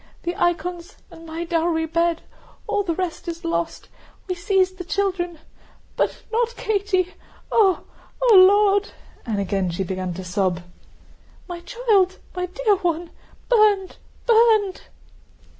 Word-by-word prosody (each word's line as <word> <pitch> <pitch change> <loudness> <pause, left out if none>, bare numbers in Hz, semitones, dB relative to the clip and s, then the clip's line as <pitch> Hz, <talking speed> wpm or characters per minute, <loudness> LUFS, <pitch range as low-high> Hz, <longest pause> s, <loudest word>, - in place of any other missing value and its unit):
The 345 +1 -2
icons, 350 +2 -2
and 330 0 -12
my 325 +1 -4
dowry 330 -1 0
bed, 335 +1 0 0.4
all 420 -1 0
the 345 -5 -2
rest 360 -2 -4
is 335 -1 -5
lost. 170 0 -2 0.4
We 365 - -1
seized 370 +1 +1
the - - -4
children. 360 -2 -1 0.6
But - - -1
not 475 +1 0
Katie! 390 -3 0 0.4
Ooh! 390 -5 +4 0.4
O 485 -4 +5
Lord!..." 405 +2 +5 0.3
and 215 -3 -1
again 195 -1 -1
she 175 +3 -2
began 185 -1 -4
to 190 - -6
sob. 180 -1 -1 0.8
"My 350 -2 -6
child, 405 -2 +1 0.2
my 360 0 -2
dear 415 +2 +1
one! 345 -2 -2 0.4
Burned, 420 -5 +3 0.3
burned!" 445 -4 +4
360 Hz, 130 wpm, -22 LUFS, 330-405 Hz, 0.8 s, O